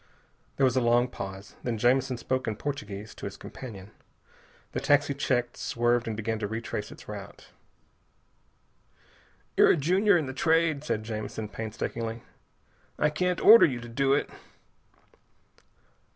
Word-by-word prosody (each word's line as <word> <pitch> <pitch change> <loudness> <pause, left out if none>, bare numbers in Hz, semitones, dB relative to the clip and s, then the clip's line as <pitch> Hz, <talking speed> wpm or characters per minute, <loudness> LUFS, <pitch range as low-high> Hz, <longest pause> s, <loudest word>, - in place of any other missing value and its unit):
There 135 - +3
was 130 -1 +2
a 130 - +3
long 120 +1 +3
pause. 95 -4 -8
Then 120 -2 -2
Jamison 125 +2 +2
spoke 130 +2 -2
in 110 - -1
Portuguese 105 -6 -5
to - - -7
his - - -9
companion. 105 -6 -9 0.8
The - - -2
taxi 145 0 +3
checked, 120 -3 -1
swerved, 120 0 0
and 110 -2 -3
began 110 0 -2
to 105 - -2
retrace 110 -1 -4
its - - -13
route. - - -9 2.1
"You're - - +6
a - - +5
junior 185 +6 +3
in 160 - -1
the 130 - -5
Trade," 160 0 +2
said 110 -7 -2
Jamison 110 -1 -5
painstakingly. 115 +1 -4 0.7
"I 150 - +2
can't 180 +3 0
order 225 -3 +9
you 125 -5 -3
to 120 - -9
do 135 +4 +1
it." 140 - 0
120 Hz, 145 wpm, -28 LUFS, 110-140 Hz, 2.1 s, order